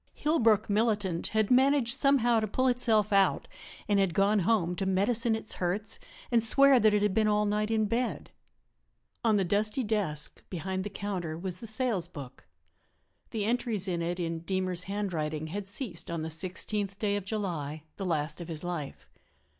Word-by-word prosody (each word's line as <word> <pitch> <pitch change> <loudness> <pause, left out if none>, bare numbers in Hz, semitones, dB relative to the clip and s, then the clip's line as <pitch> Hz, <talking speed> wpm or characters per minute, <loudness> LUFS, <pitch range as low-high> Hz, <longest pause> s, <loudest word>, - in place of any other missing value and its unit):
Hillbrook 225 -9 +2
militant 205 -5 0
had 220 0 0
managed 265 -1 +4
somehow 255 -4 +3
to 215 - -1
pull 255 +6 0
itself 225 -4 +2
out 195 -1 +3 0.4
and 205 -1 +2
had 190 -4 +1
gone 205 +2 +3
home 180 -3 +1
to 195 - -1
medicine 220 +4 +2
its 220 -1 -3
hurts 200 +4 -2 0.3
and 230 -2 +3
swear 275 +3 +6
that 215 -2 +4
it 205 - +2
had 210 -2 +1
been 215 +1 +2
all 210 0 +2
night 210 +1 0
in 220 -1 +1
bed. 235 +4 -2 0.9
On 225 -2 +3
the 200 - +2
dusty 210 +7 +1
desk, 200 -9 0
behind 190 +1 -3
the 205 - -4
counter, 190 -5 -4
was 180 +1 -5
the 230 - -7
sales 220 -6 -1
book. 140 -7 -11 0.8
The 215 -3 -2
entries 225 -4 -1
in 175 -2 -1
it, 175 +2 -2
in 165 -1 -2
Deemer's 185 0 -2
handwriting, 165 -7 -3
had 200 -1 -4
ceased 200 -4 -4
on 170 -2 -3
the 160 - -4
16th 195 +4 -2
day 205 -1 0
of 205 - -3
July, 170 -8 -4
the 195 - -4
last 160 -1 -2
of 170 - -7
his 160 -2 -6
life. 170 -6 -5
205 Hz, 180 wpm, -29 LUFS, 175-220 Hz, 0.9 s, swear